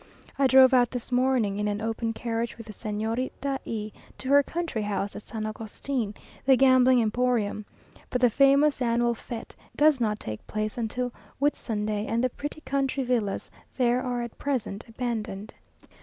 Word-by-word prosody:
I 275 Hz, -, +5 dB
drove 260 Hz, 0 st, +7 dB
out 245 Hz, -2 st, +5 dB
this 245 Hz, 0 st, -5 dB
morning 245 Hz, -5 st, +2 dB
in 210 Hz, -, 0 dB
an 205 Hz, 0 st, -1 dB
open 225 Hz, +1 st, -2 dB
carriage 230 Hz, 0 st, -3 dB
with 230 Hz, -, -9 dB
the 215 Hz, -, -9 dB
Señorita 230 Hz, +6 st, -3 dB
E 215 Hz, -1 st, -4 dB, 0.3 s
to 260 Hz, -, -6 dB
her 285 Hz, +1 st, +7 dB
country 330 Hz, -6 st, -3 dB
house 205 Hz, -1 st, -2 dB
at -, -, -6 dB
San 215 Hz, 0 st, -5 dB
Agustin, 215 Hz, +1 st, -4 dB, 0.3 s
the 265 Hz, 0 st, +6 dB
gambling 255 Hz, -1 st, +6 dB
emporium. 225 Hz, -2 st, 0 dB, 0.4 s
But 250 Hz, -, 0 dB
the 245 Hz, -2 st, +5 dB
famous 280 Hz, +3 st, +4 dB
annual 235 Hz, 0 st, +2 dB
fête 230 Hz, 0 st, -8 dB, 0.2 s
does 295 Hz, -3 st, +4 dB
not 215 Hz, -2 st, 0 dB
take 110 Hz, 0 st, -7 dB
place 215 Hz, +3 st, -3 dB
till 250 Hz, +1 st, -3 dB, 0.3 s
Whitsunday, 215 Hz, -7 st, -1 dB
and 230 Hz, +2 st, 0 dB
the 255 Hz, -, +1 dB
pretty 290 Hz, +4 st, -6 dB
country 275 Hz, -2 st, -1 dB
villas 235 Hz, -6 st, -1 dB, 0.3 s
there 245 Hz, -1 st, +3 dB
are 245 Hz, -1 st, -2 dB
at 235 Hz, -, -8 dB
present 245 Hz, -7 st, -2 dB
abandoned. 225 Hz, -3 st, -4 dB
240 Hz, 165 wpm, -27 LUFS, 215-260 Hz, 0.4 s, drove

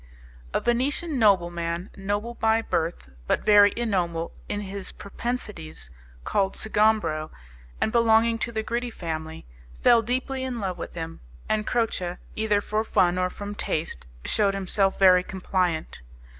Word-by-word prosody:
A -, -, +1 dB
Venetian 270 Hz, +5 st, 0 dB
nobleman, 175 Hz, -3 st, +1 dB
noble 205 Hz, +4 st, -2 dB
by 225 Hz, -1 st, +2 dB
birth, 165 Hz, -, -2 dB, 0.2 s
but -, -, 0 dB
very 205 Hz, -1 st, +7 dB
ignoble 175 Hz, -8 st, -1 dB, 0.2 s
in 205 Hz, -, -2 dB
his 200 Hz, -1 st, -6 dB
propensities, 200 Hz, -, -5 dB, 0.3 s
called 195 Hz, -, 0 dB
Sgombro, 210 Hz, -8 st, +1 dB, 0.5 s
and 220 Hz, -, +1 dB
belonging 230 Hz, 0 st, +4 dB
to 235 Hz, -, -2 dB
the 220 Hz, -1 st, -2 dB
Gritti 240 Hz, +2 st, -2 dB
family, 160 Hz, -4 st, -5 dB, 0.4 s
fell 235 Hz, -1 st, +7 dB
deeply 260 Hz, +3 st, -2 dB
in 255 Hz, -2 st, -3 dB
love 190 Hz, -3 st, -3 dB
with -, -, -7 dB
him, 165 Hz, -1 st, -6 dB, 0.3 s
and 215 Hz, -1 st, 0 dB
Croce, 185 Hz, -7 st, -1 dB, 0.2 s
either 215 Hz, -2 st, +1 dB
for 215 Hz, +1 st, -1 dB
fun 180 Hz, -4 st, +2 dB
or 180 Hz, 0 st, +1 dB
from 205 Hz, +2 st, -6 dB
taste, 155 Hz, -, -3 dB, 0.2 s
shewed 200 Hz, -2 st, +2 dB
himself 195 Hz, 0 st, +1 dB
very 185 Hz, -2 st, +7 dB
compliant. 180 Hz, -, -2 dB
205 Hz, 140 wpm, -26 LUFS, 175-225 Hz, 0.5 s, very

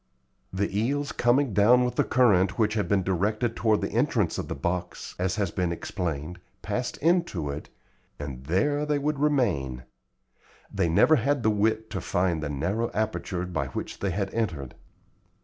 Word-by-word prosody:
The 100 Hz, +1 st, -2 dB
eels 140 Hz, +7 st, 0 dB
coming 120 Hz, 0 st, +2 dB
down 120 Hz, +5 st, +5 dB
with 125 Hz, -, -1 dB
the -, -, +2 dB
current 100 Hz, -7 st, +3 dB
which 110 Hz, -2 st, +2 dB
had 105 Hz, -2 st, 0 dB
been 100 Hz, -2 st, +2 dB
directed 105 Hz, +6 st, 0 dB
toward 110 Hz, -2 st, +2 dB
the -, -, -2 dB
entrance -, -, +1 dB
of -, -, -4 dB
the -, -, -4 dB
box, 90 Hz, +5 st, -3 dB
as 90 Hz, 0 st, 0 dB
has 100 Hz, -5 st, -1 dB
been 90 Hz, -1 st, -1 dB
explained, 85 Hz, -1 st, -4 dB, 0.2 s
passed 125 Hz, 0 st, -3 dB
into 165 Hz, -, +1 dB
it, 70 Hz, -, -7 dB, 0.5 s
and 70 Hz, -3 st, -7 dB
there 125 Hz, -, +1 dB
they 150 Hz, -1 st, +1 dB
would 145 Hz, 0 st, -1 dB
remain. 95 Hz, -, +1 dB, 0.9 s
They 95 Hz, -4 st, +1 dB
never 155 Hz, -, +5 dB
had 140 Hz, +2 st, 0 dB
the 110 Hz, -, +4 dB
wit 110 Hz, +1 st, 0 dB
to 95 Hz, -, -3 dB
find 90 Hz, -3 st, 0 dB
the 75 Hz, -, -3 dB
narrow 95 Hz, +12 st, -1 dB
aperture 105 Hz, -4 st, -2 dB
by 90 Hz, -, -2 dB
which -, -, -6 dB
they 100 Hz, -, -1 dB
had 95 Hz, +1 st, -2 dB
entered. 80 Hz, -, -2 dB
100 Hz, 170 wpm, -26 LUFS, 90-120 Hz, 0.9 s, down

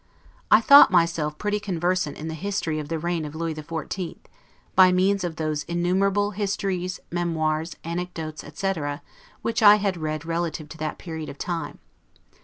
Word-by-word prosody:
I 215 Hz, -, +7 dB
thought 280 Hz, +5 st, +9 dB
myself 165 Hz, -4 st, +1 dB
pretty 210 Hz, 0 st, -1 dB
conversant 180 Hz, -5 st, -1 dB
in 155 Hz, -, -6 dB
the 160 Hz, -, -4 dB
history 165 Hz, -3 st, -2 dB
of 150 Hz, -1 st, -6 dB
the 165 Hz, -, -1 dB
reign 170 Hz, 0 st, -2 dB
of 150 Hz, 0 st, -7 dB
Lewis 165 Hz, 0 st, -2 dB
XIV., 165 Hz, +3 st, -5 dB, 0.6 s
by 185 Hz, -1 st, +7 dB
means 190 Hz, +2 st, +2 dB
of 170 Hz, -2 st, -3 dB
those 155 Hz, -1 st, -2 dB
innumerable 190 Hz, +4 st, +1 dB
histories, 190 Hz, -3 st, -2 dB
memoirs, 160 Hz, -2 st, -1 dB
anecdotes, 165 Hz, -2 st, -5 dB
etc., 150 Hz, -3 st, -3 dB, 0.4 s
which 230 Hz, -, -1 dB
I 210 Hz, -1 st, +9 dB
had 200 Hz, -3 st, -1 dB
read 155 Hz, -1 st, -3 dB
relative 165 Hz, -2 st, -2 dB
to 160 Hz, -, -10 dB
that 155 Hz, 0 st, -3 dB
period 160 Hz, -3 st, -6 dB
of 140 Hz, -, -9 dB
time. 165 Hz, -3 st, -4 dB
170 Hz, 160 wpm, -24 LUFS, 155-190 Hz, 0.6 s, thought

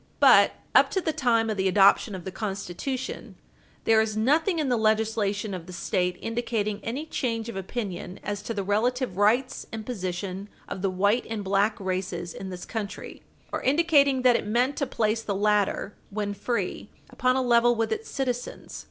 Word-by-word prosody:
But -, -, +7 dB, 0.2 s
up -, -, +6 dB
to -, -, +5 dB
the 320 Hz, -4 st, -1 dB
time 240 Hz, -6 st, +2 dB
of 210 Hz, -, -3 dB
the 190 Hz, 0 st, +1 dB
adoption 195 Hz, +2 st, +4 dB
of 180 Hz, -, -8 dB
the 190 Hz, -, -4 dB
Constitution, 205 Hz, +6 st, -5 dB, 0.5 s
there 220 Hz, -1 st, +5 dB
is 215 Hz, -1 st, -2 dB
nothing 315 Hz, -, +2 dB
in 305 Hz, -3 st, 0 dB
the 250 Hz, -, +2 dB
legislation 215 Hz, -2 st, 0 dB
of 180 Hz, -2 st, -6 dB
the 180 Hz, -, -9 dB
State 180 Hz, 0 st, -1 dB
indicating 225 Hz, -3 st, -2 dB
any 265 Hz, +7 st, -3 dB
change 230 Hz, -7 st, -2 dB
of 230 Hz, -, -6 dB
opinion 195 Hz, -2 st, -5 dB
as 205 Hz, 0 st, -3 dB
to 230 Hz, -, -4 dB
the 200 Hz, -, -1 dB
relative 235 Hz, +3 st, 0 dB
rights 225 Hz, +6 st, +1 dB
and 220 Hz, -1 st, -6 dB
position 190 Hz, -3 st, -4 dB, 0.2 s
of 190 Hz, -, -6 dB
the 195 Hz, -, +1 dB
white 205 Hz, +6 st, +1 dB
and 220 Hz, -2 st, -3 dB
black 200 Hz, +3 st, +1 dB
races 185 Hz, -2 st, -3 dB
in 190 Hz, -, -7 dB
this 180 Hz, -1 st, -7 dB
country, 215 Hz, -3 st, -6 dB, 0.3 s
or -, -, -2 dB
indicating 280 Hz, -2 st, +3 dB
that 250 Hz, -2 st, +6 dB
it -, -, -1 dB
meant 245 Hz, +6 st, +1 dB
to 280 Hz, -, 0 dB
place 225 Hz, -2 st, 0 dB
the 200 Hz, -3 st, -3 dB
latter, 205 Hz, 0 st, +1 dB, 0.2 s
when 205 Hz, 0 st, -3 dB
free, 205 Hz, -2 st, -3 dB, 0.2 s
upon 255 Hz, 0 st, +1 dB
a 260 Hz, -, +2 dB
level 240 Hz, 0 st, +4 dB
with 225 Hz, 0 st, -1 dB
its 445 Hz, +1 st, -3 dB
citizens. 250 Hz, -3 st, -4 dB
215 Hz, 185 wpm, -26 LUFS, 195-245 Hz, 0.5 s, But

